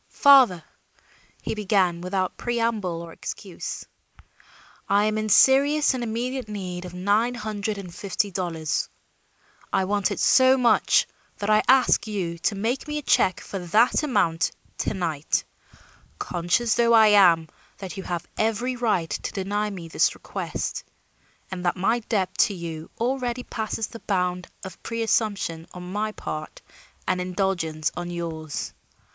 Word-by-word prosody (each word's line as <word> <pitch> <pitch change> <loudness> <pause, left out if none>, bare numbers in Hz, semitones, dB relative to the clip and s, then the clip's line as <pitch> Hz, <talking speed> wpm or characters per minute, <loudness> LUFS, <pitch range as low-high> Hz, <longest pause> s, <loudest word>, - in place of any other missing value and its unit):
"Father," 260 - +6 0.8
he - - -2
began 195 -5 +1
without 185 0 -2
preamble 225 -8 -1
or 165 -1 -10
excuse, - - -6 1.0
"I 205 +1 +4
am 215 0 0
in 215 0 -2
serious 280 +7 +5
and 250 -2 -3
immediate 240 +2 -3
need 185 -3 -5
of 180 - -8
nine 210 +6 +1
hundred 215 -2 -3
and 180 -3 -8
fifty 200 +2 -2
dollars. 170 -4 -2 0.8
I 190 - +2
want 200 0 +1
it - - -4
so 260 0 +5
much 245 -2 +4 0.3
that 205 +1 -1
I 215 - +5
ask 255 -3 +4
you 180 -5 -3
to 200 - 0
make 230 +9 -2
me 300 0 -3
a 300 - -4
check 185 -7 +2
for 195 - -6
that 210 - +3
amount 185 - +1 0.3
to - - -1
night, 160 -5 -1 0.7
conscious 175 - 0
though 235 0 +3
I 220 -2 +7
am 175 -6 +5 0.3
that 190 -1 -7
you 195 - -5
have 175 -2 -4
every 225 +4 0
right 210 -9 0
to - - -3
deny 205 +1 -1
me 180 -5 -7
this 165 - +2
request, - - -4 0.7
and 180 -1 -5
that 175 - +1
my 225 +6 +2
debt 200 -5 -2
to 200 - +3
you 165 -2 -7
already 250 0 -1
passes 220 -1 -3
the 230 - -10
bound 180 -3 -1 0.2
of 190 -1 -9
presumption 215 -7 -1
on 180 0 -8
my 215 +1 -1
part 155 -6 -7 0.4
and 185 -1 +1
indulgence 180 -4 -1
on 175 0 -4
yours. 165 -3 -5
200 Hz, 150 wpm, -24 LUFS, 175-230 Hz, 1.0 s, I